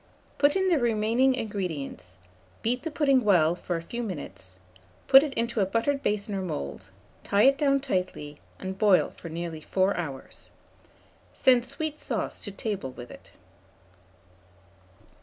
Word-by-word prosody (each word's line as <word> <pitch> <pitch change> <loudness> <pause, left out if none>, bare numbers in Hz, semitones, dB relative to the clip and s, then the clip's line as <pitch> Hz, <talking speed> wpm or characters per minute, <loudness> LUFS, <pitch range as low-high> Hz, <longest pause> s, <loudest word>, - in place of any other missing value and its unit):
Put 290 0 +4
in 380 0 +2
the 335 -5 +3
remaining 235 +3 +2
ingredients; 170 - -5 0.5
beat 245 +3 0
the 325 - -4
pudding 280 -4 +2
well 175 -6 +4
for 175 0 -4
a 165 - -4
few 235 +7 -5
minutes; 145 - -7 0.5
put 270 0 +9
it 295 -1 -2
into 235 0 -1
a - - +3
buttered 235 +7 0
basin 210 -2 -1
or 195 - -2
mould; 90 - -5 0.3
tie 200 +1 +2
it 275 +1 +6
down 275 -2 +3
tightly, 180 - -3 0.2
and 190 0 -6
boil 205 -4 +4
for 170 - -9
nearly 165 -1 -5
4 190 +5 +1
hours. 145 -6 -7 0.9
Send 250 -2 +4
sweet 305 +3 -5
sauce - - -3
to 205 - -5
table 195 -7 -4
with 120 -1 -10
it. - - -14
205 Hz, 150 wpm, -27 LUFS, 170-260 Hz, 0.9 s, put